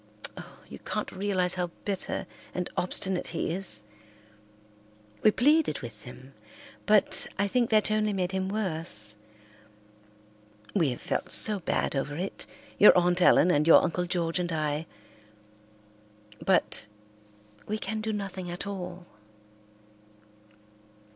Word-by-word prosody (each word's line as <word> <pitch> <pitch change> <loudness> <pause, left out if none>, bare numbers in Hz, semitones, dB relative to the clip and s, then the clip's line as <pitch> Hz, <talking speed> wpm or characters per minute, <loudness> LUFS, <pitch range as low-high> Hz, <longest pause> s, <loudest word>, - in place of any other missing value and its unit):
Oh, - - -11
you - - -10
can't - - -4
realize 185 -2 0
how 180 -1 -2 0.2
bitter 195 -2 -3 0.3
and 180 -1 -3
obstinate 185 +1 -1
he 165 -1 -3
is. 170 - +1 1.4
We - - +6
pleaded 290 - +2
with 115 -4 -9
him, 130 +2 -13 0.5
but 210 -1 +3
I 200 0 +1
think 240 +3 +1
that 215 -1 +3
only 215 0 +1
made 185 -2 -1
him 190 0 -2
worse. 160 - 0 1.6
We 165 -8 +2
have 125 - -5
felt - - -2
so 210 -2 +4
bad 165 - -1
over 145 +2 -2
it, 185 +5 -5 0.3
your 205 - +8
Aunt 180 0 +2
Ellen 180 0 +6
and 150 -1 +2
your 165 - +8
Uncle 180 +1 -1
George 170 -1 -1
and 175 -1 -2
I, 155 0 -2 1.6
but - - +1 0.8
we 215 - -2
can 215 +1 -4
do 220 0 -2
nothing 195 -3 -5
at 175 +3 -6
all." 180 -3 -6
180 Hz, 130 wpm, -28 LUFS, 165-200 Hz, 1.6 s, your